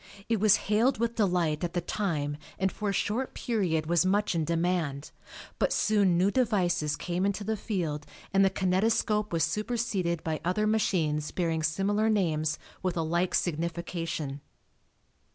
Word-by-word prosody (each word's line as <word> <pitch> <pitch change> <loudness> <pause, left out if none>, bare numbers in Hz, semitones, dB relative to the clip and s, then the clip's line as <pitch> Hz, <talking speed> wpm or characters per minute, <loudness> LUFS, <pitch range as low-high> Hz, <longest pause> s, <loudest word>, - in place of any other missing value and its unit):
It 225 -2 +1
was 210 0 +6
hailed 225 +6 +3
with 230 +1 0
delight 180 -8 +1
at 175 - -2
the 175 - +1
time 155 -6 -2 0.2
and 190 0 +1
for 210 +2 -3
a - - +1
short 225 +6 -1
period 180 -9 0
was 170 +2 +3
much 200 +2 +1
in 165 -2 0
demand, 165 -4 -1 0.5
but - - +2
soon 200 -5 +3
new 190 +3 +3
devices 185 - +1
came 180 +1 -2
into 200 +1 0
the 220 +2 -1
field 165 -8 -3 0.3
and 195 0 +5
the 195 - +5
kinetoscope 210 +3 +1
was 165 -2 +1
superseded 210 -6 -1
by 160 -1 -2
other 185 +5 +1
machines 165 -9 +1
bearing 165 -3 -1
similar 200 +7 +1
names 160 -7 +1 0.2
with 180 -2 -1
a 165 - +1
like 170 +3 0
signification. 165 -3 -2
180 Hz, 155 wpm, -28 LUFS, 165-210 Hz, 0.5 s, was